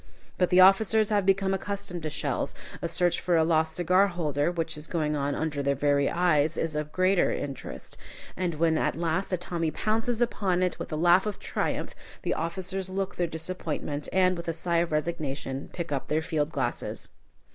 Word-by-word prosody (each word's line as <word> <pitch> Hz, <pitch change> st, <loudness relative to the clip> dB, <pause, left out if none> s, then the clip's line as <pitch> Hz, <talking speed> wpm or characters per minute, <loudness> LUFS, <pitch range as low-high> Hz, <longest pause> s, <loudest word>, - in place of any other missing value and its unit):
But 180 Hz, -, +3 dB
the 180 Hz, 0 st, +6 dB
officers 210 Hz, +3 st, +5 dB
have 205 Hz, -3 st, +1 dB
become 195 Hz, 0 st, +3 dB
accustomed 200 Hz, -2 st, -3 dB
to 155 Hz, -, -3 dB
shells; -, -, -2 dB, 0.3 s
a -, -, -1 dB
search 175 Hz, +1 st, +1 dB
for 175 Hz, -1 st, +1 dB
a 160 Hz, -, +5 dB
lost 160 Hz, -1 st, +2 dB
cigar 185 Hz, +3 st, +4 dB
holder, 155 Hz, -5 st, 0 dB
which 165 Hz, -2 st, -2 dB
is 150 Hz, +1 st, -5 dB
going 150 Hz, -3 st, -1 dB
on 140 Hz, 0 st, -1 dB
under 150 Hz, -3 st, -2 dB
their 140 Hz, 0 st, +1 dB
very 140 Hz, 0 st, +2 dB
eyes, 160 Hz, -3 st, +2 dB
is 160 Hz, -2 st, -1 dB
of 150 Hz, 0 st, -3 dB
greater 185 Hz, +1 st, +3 dB
interest. 140 Hz, -1 st, -6 dB, 0.4 s
And 180 Hz, -3 st, -1 dB
when 160 Hz, 0 st, +2 dB
at -, -, 0 dB
last 170 Hz, +4 st, -1 dB
a 185 Hz, -, +1 dB
Tommy 170 Hz, -2 st, -2 dB
pounces 225 Hz, +6 st, -1 dB
upon 195 Hz, -6 st, +1 dB
it 180 Hz, -, -1 dB
with -, -, -6 dB
a -, -, -1 dB
laugh 175 Hz, +5 st, +4 dB
of 210 Hz, -, -3 dB
triumph, -, -, -2 dB, 0.3 s
the -, -, 0 dB
officers 185 Hz, +3 st, -3 dB
look 195 Hz, 0 st, -3 dB
their 175 Hz, -, 0 dB
disappointment, 160 Hz, -3 st, -4 dB
and, 185 Hz, -1 st, +3 dB
with 170 Hz, 0 st, -7 dB
a 165 Hz, -, 0 dB
sigh 170 Hz, +1 st, 0 dB
of 170 Hz, 0 st, +1 dB
resignation, 150 Hz, -4 st, -3 dB
pick 170 Hz, -3 st, -5 dB
up 140 Hz, -2 st, -2 dB
their 155 Hz, +1 st, 0 dB
field 155 Hz, -2 st, -1 dB
glasses. 130 Hz, -5 st, -3 dB
170 Hz, 195 wpm, -27 LUFS, 155-185 Hz, 0.4 s, the